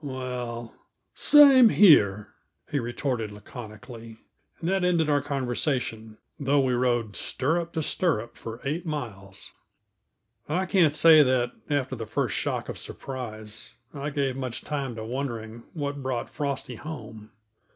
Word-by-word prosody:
"Well, 125 -3 -5 0.4
same 275 -5 +7
here," 105 - +5 0.4
he 145 - +1
retorted 120 -2 -2
laconically; 115 +2 -10 0.4
and 165 - -4
that 190 0 +1
ended 170 -4 +2
our 145 -1 +3
conversation, 125 -5 -2 0.2
though 140 0 +2
we 130 -2 +2
rode 120 -4 0
stirrup 165 +5 -1
to 160 - -1
stirrup 120 - 0
for 115 +1 -8
eight 155 +5 -2
miles. 110 - -6 1.0
I 180 +5 0
can't 175 -6 +3
say 160 0 +8
that, 125 -3 +2 0.2
after 135 -3 0
the 115 -2 -6
first - - -1
shock - - -2
of - - -5
surprise, 110 -4 -6 0.2
I 140 +1 -4
gave 140 -3 -1
much 130 -3 -4
time 140 -5 -4
to 110 -1 -6
wondering 115 -2 -5
what 145 -2 -3
brought 130 -3 -3
Frosty 140 -5 -3
home. 110 -8 -9
130 Hz, 135 wpm, -26 LUFS, 115-150 Hz, 1.0 s, say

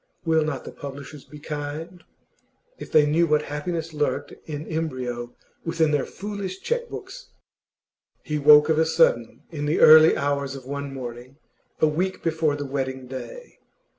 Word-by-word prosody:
Will 160 -1 +3
not 150 -4 -3
the - - -7
publishers 140 0 -9
be 150 - -12
kind? 150 +4 -6 0.8
If - - -9
they 150 -1 +6
knew 165 +3 +2
what 150 -1 +2
happiness 160 +3 -4
lurked 150 -1 -2 0.2
in 150 0 -5
embryo 130 -7 -4 0.3
within 165 -2 +1
their 145 -2 0
foolish 200 -2 -6
cheque 480 0 -2
books! - - -9 0.9
He 150 -1 -2
woke 150 +1 +7
of 160 0 +3
a 160 - +4
sudden 160 -8 +2
in 145 -2 -3
the 150 - +1
early 155 +1 +8
hours 140 -1 -1
of 130 -2 -10
one 140 +1 -5
morning, 125 0 -8 0.4
a 155 - +4
week 180 +5 -2
before 160 -3 +1
the 145 0 -5
wedding 130 -1 -3
day. 470 - -9
150 Hz, 160 wpm, -24 LUFS, 140-160 Hz, 0.9 s, early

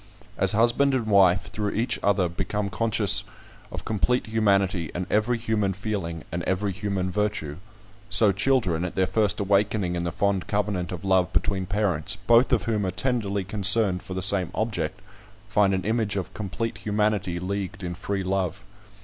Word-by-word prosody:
As 95 0 +3
husband 120 +5 +3
and 120 -4 -1
wife, 95 -3 +3
through 105 -1 -2
each 115 +4 -1
other 95 -2 +2
become 100 +4 -3
conscious 110 -3 +2 0.5
of - - -7
complete 110 +3 0
humanity, 100 -6 +1
and 90 +1 -2
every 110 +3 +2
human 110 -4 0
feeling, 90 -5 -4
and 85 - -3
every 100 +2 0
human 95 -1 -2
virtue; 105 -8 -2 0.5
so 105 0 +5
children, 100 -5 +1
at 90 - -4
their 95 - +2
first 105 +1 +1
awakening 100 -2 +1
in 85 - -2
the 85 - -2
fond 100 +1 0
covenant 100 -4 -1
of 90 +1 -6
love 95 -2 +2
between 95 -2 0
parents, 100 -3 0
both 115 +5 +3
of 125 - +2
whom 110 -3 -1
are 95 - 0
tenderly 105 -1 -1
concerned 95 -1 +3
for 95 -1 -8
the 95 - -2
same 100 -3 +2
object, 110 0 -2 0.5
find 100 -2 +3
an 95 -1 -1
image 110 -2 0
of 95 -2 -4
complete 110 +3 -4
humanity 105 -4 0
leagued 95 +1 -4
in 90 -1 -3
free 95 +2 -3
love. 95 -2 -2
100 Hz, 170 wpm, -25 LUFS, 95-105 Hz, 0.5 s, so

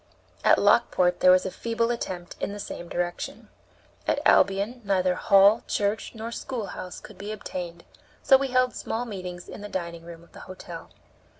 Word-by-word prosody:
At - - +6
Lockport 180 -1 +3
there 185 - +6
was 185 0 +6
a 190 - -2
feeble 230 +2 -1
attempt 180 -7 -5
in 200 - -3
the 205 - -7
same 175 -3 -7
direction. 175 0 -4 0.6
At - - +2
Albion 200 +5 +3
neither 185 -2 +2
hall, 200 +4 +5
church, 205 +3 -1
nor 225 +1 -5
schoolhouse 220 -7 -5
could 215 - -14
be 205 +2 -5
obtained, 175 -5 -6 0.4
so 270 - +7
we 270 +1 +2
held 255 -1 +2
small 235 +2 -3
meetings 185 -5 -7
in - - -9
the 205 - -7
dining 170 -3 -5
room 170 0 -11
of 170 - -21
the - - -13
hotel. 185 - -9
195 Hz, 175 wpm, -26 LUFS, 180-225 Hz, 0.6 s, so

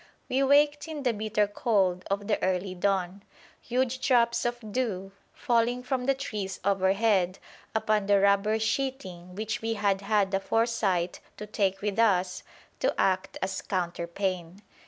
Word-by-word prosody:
We 260 +2 +1
waked 290 +2 +3
in 305 -3 -5
the 245 -3 +2
bitter 210 0 0
cold 200 -3 0
of 200 +1 -1
the 210 0 0
early 185 0 0
dawn, 190 0 -1 0.4
huge 255 +1 -1
drops 235 -2 +3
of 240 -3 -3
dew 200 -6 -2 0.2
falling 240 +1 0
from 255 0 -2
the 275 - +3
trees 210 -8 -4
overhead 195 -1 +2 0.4
upon 215 -2 +1
the 200 -1 +5
rubber 200 +2 +3
sheeting 220 -7 -3
which 220 +3 -3
we 225 0 -1
had 200 -2 +1
had 200 -1 +1
the 195 - +1
foresight 195 -5 0 0.2
to 210 - -6
take 195 -2 -1
with 205 +1 -1
us 185 -5 +2 0.4
to - - 0
act 185 0 +1
as 190 0 -2
counterpane. 180 +1 -3
205 Hz, 150 wpm, -28 LUFS, 190-235 Hz, 0.4 s, the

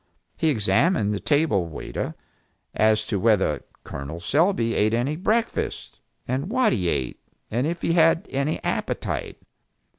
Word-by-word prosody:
He 160 - +1
examined 105 - +2
the 100 - -2
table 145 - +2
waiter, 80 - -5 0.6
as 110 0 +3
to 105 -2 -1
whether 110 -2 +2 0.2
Col. 70 +4 -6
Selby 130 - +2
ate 110 +2 +2
any 130 +6 0
breakfast, 220 +7 -1 0.3
and 135 +8 -2
what 255 -1 +3
he 90 -5 0
ate, 65 -6 -2 0.3
and 120 +6 0
if 170 +1 -4
he 165 - +2
had 165 0 +4
any 140 +3 -1
appetite. - - -3
120 Hz, 140 wpm, -24 LUFS, 105-165 Hz, 0.6 s, had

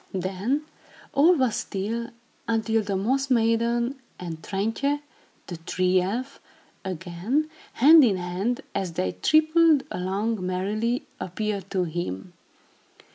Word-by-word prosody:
Then, 195 - -1 0.5
all 320 +6 +6
was 255 -7 +1
still, 225 +4 -3 0.4
until 225 0 +1
the 200 -2 -2
Moss 265 +8 0
Maiden 235 +2 +1 0.2
and 165 -3 -6
Trintje, 225 - -1 0.5
the 175 - -7
Tree 185 +2 +1
Elf, 245 +9 -3 0.4
again, 190 - -2 0.2
hand 305 +5 +8
in 210 -7 +3
hand, 185 +7 -2
as 185 -3 -2
they 95 - -1
tripped 315 -1 +4
along 195 +3 -2
merrily, 210 +7 -1
appeared 200 +1 -3
to 185 -2 0
him. 175 - -4
215 Hz, 115 wpm, -25 LUFS, 185-255 Hz, 0.5 s, hand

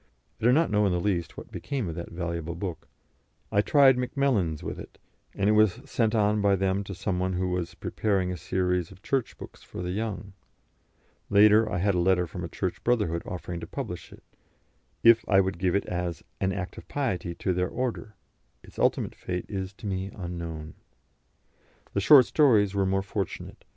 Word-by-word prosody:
I - - -3
do 120 - +6
not 160 +5 +3
in 105 -2 +3
the 90 - +1
least 85 -3 -1
know - - -8
what - - -26
became 135 -8 -3
of 85 - -4
that 85 +1 -6
valuable 85 -1 -4
book; 90 -1 -5 0.6
I 100 - +4
tried 135 +1 +5
Macmillans 125 - 0
with - - -5
it, - - -11 0.4
and 100 - +1
it 105 - +5
was 110 0 +4
sent 115 -4 0
on 105 -1 +2
by 100 -1 +4
them 95 +1 0
to 100 - -6
some 90 0 -2
one 95 0 0
who 90 0 -1
was 90 -1 -3
preparing 95 +1 -1
a - - -3
series 90 +1 -1
of 95 0 -16
Church 135 -4 -1
books - - -11
for - - -8
the 90 - -3
young; 100 -1 -4 1.0
later 105 +2 +6
I 90 - -1
had 100 +3 +2
a 90 - +1
letter 90 0 +3
from 90 +1 -7
a - - -3
Church 90 +2 -4
brotherhood 105 -9 +1
offering 90 -1 -5
to 85 - -7
publish - - -6
it, - - -15 0.8
if 115 -1 +7
I 95 -2 +6
would 95 -2 0
give 90 0 +1
it 100 - +1
as 90 -2 -3 0.2
"an 95 0 +1
act 90 -2 -5
of - - -15
piety" 95 -11 -2
to 95 - -1
their 90 0 0
order; 115 -4 -4 0.5
its - - -13
ultimate - - +1
fate 90 -1 -4
is 95 -2 -4
to 95 - -12
me 95 -1 -2
unknown. 85 -4 -6 1.2
The 100 - 0
short 135 +3 +8
stories 110 -10 +4
were 100 -1 +1
more 95 0 +1
fortunate. 100 -1 -5
95 Hz, 195 wpm, -27 LUFS, 90-105 Hz, 1.2 s, short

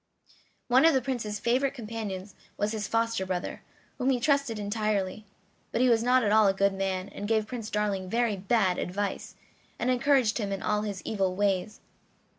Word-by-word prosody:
One 255 +2 +5
of 325 -2 +6
the 265 - +3
Prince's 225 -6 -3
favorite 260 +5 +1
companions 210 -5 -6 0.2
was 205 +1 0
his 215 -1 -3
foster 230 -3 0
brother, 185 -1 -4 0.4
whom 255 +1 +1
he 255 -2 +2
trusted 280 -3 +1
entirely; 210 -1 -2 0.5
but - - -1
he 255 0 +4
was 230 -2 +4
not 250 +1 +3
at 205 - +1
all 215 -1 +6
a 195 - +2
good 200 0 +2
man, 190 -1 -2
and 205 - -6
gave 220 -1 +2
Prince 225 -1 -6
Darling 200 -3 -1
very 230 0 +1
bad 195 -1 +1
advice, 200 +2 -3 0.4
and 250 - 0
encouraged 250 -3 +2
him 200 -2 -2
in 195 - -3
all 210 0 +1
his 205 -3 -5
evil 195 -4 0
ways. 200 +1 0
215 Hz, 185 wpm, -28 LUFS, 195-240 Hz, 0.5 s, of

